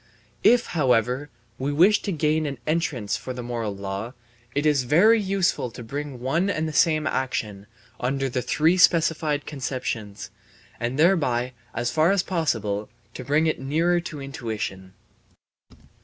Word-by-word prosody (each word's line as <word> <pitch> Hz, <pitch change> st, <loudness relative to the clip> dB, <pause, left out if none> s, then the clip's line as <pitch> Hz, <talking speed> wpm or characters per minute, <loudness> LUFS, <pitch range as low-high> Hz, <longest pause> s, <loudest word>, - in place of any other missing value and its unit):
If, 240 Hz, 0 st, +5 dB
however, 130 Hz, -1 st, +1 dB, 0.3 s
we 135 Hz, +2 st, -1 dB
wish 180 Hz, +8 st, +4 dB
to 200 Hz, -, -3 dB
gain 155 Hz, -1 st, +1 dB
an 140 Hz, -2 st, -4 dB
entrance 150 Hz, -, -1 dB
for 130 Hz, -, -6 dB
the 125 Hz, -1 st, -6 dB
moral 115 Hz, -4 st, -3 dB
law, 100 Hz, +4 st, -5 dB, 0.4 s
it 145 Hz, +1 st, 0 dB
is 150 Hz, -3 st, +3 dB
very 190 Hz, -, +4 dB
useful 190 Hz, -9 st, 0 dB
to 120 Hz, +1 st, -10 dB
bring 140 Hz, +2 st, -5 dB
one 165 Hz, +10 st, 0 dB
and 160 Hz, -5 st, -1 dB
the 155 Hz, -, -5 dB
same 155 Hz, -1 st, +3 dB
action 105 Hz, -8 st, -2 dB, 0.3 s
under 135 Hz, +2 st, -1 dB
the 125 Hz, 0 st, -2 dB
three 160 Hz, +8 st, +2 dB
specified 160 Hz, -4 st, +3 dB
conceptions, 125 Hz, -7 st, -5 dB, 0.5 s
and 120 Hz, +3 st, -2 dB
thereby 135 Hz, -8 st, +2 dB, 0.2 s
as 120 Hz, +1 st, -1 dB
far 155 Hz, +6 st, +3 dB
as 195 Hz, -2 st, +2 dB
possible 110 Hz, -, -1 dB, 0.2 s
to 130 Hz, -, -7 dB
bring 150 Hz, +5 st, +2 dB
it 160 Hz, -, 0 dB
nearer 165 Hz, +6 st, +1 dB
to 170 Hz, -4 st, -7 dB
intuition. 110 Hz, -8 st, -5 dB
140 Hz, 150 wpm, -24 LUFS, 120-160 Hz, 0.5 s, If